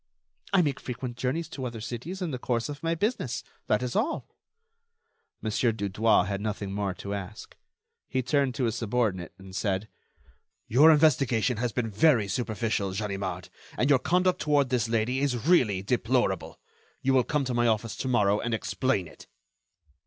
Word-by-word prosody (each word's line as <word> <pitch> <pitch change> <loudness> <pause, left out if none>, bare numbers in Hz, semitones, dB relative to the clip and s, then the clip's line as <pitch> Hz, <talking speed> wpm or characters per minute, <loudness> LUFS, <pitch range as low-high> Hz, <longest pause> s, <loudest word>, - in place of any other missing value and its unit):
"I 195 -3 +5
make 145 -4 -1
frequent 125 -1 -5
journeys 140 +7 -2
to 140 -5 -7
other 120 -2 -5
cities 125 - -5
in 170 - -2
the 130 - -4
course 120 +1 -1
of 145 -1 -7
my 165 0 0
business. 205 - -1 0.2
That 105 +4 +2
is 125 0 -3
all." 260 +10 0 1.2
Mon. 110 - -1
Dudouis 105 -3 +2
had 100 0 -3
nothing 105 -2 -3
more 100 -2 -2
to 100 +1 -5
ask. 100 +1 -7 0.5
He 130 - 0
turned 135 0 +1
to 135 - -1
his 115 -2 +1
subordinate, 110 -6 -1
and 95 -1 -12
said: 100 +1 -1 0.8
"Your 145 +8 +6
investigation 130 -6 +3
has 120 +1 -1
been 115 -1 -2
very 120 -2 +4
superficial, 110 -2 -1
Ganimard, 95 -3 -3 0.3
and 135 +4 +2
your 135 - +6
conduct 180 +5 +1
toward 145 -3 +2
this 120 -2 0
lady 115 +3 +1
is 130 -4 -1
really 115 - +3
deplorable. 120 +5 0 0.4
You 135 - +3
will 130 -1 +5
come 145 +1 0
to 125 - -2
my 120 0 +2
office 110 0 0
to - - -3
morrow 105 -4 +3
and 120 -1 -1
explain 110 -4 -1
it." - - -15
120 Hz, 170 wpm, -27 LUFS, 105-135 Hz, 1.2 s, Your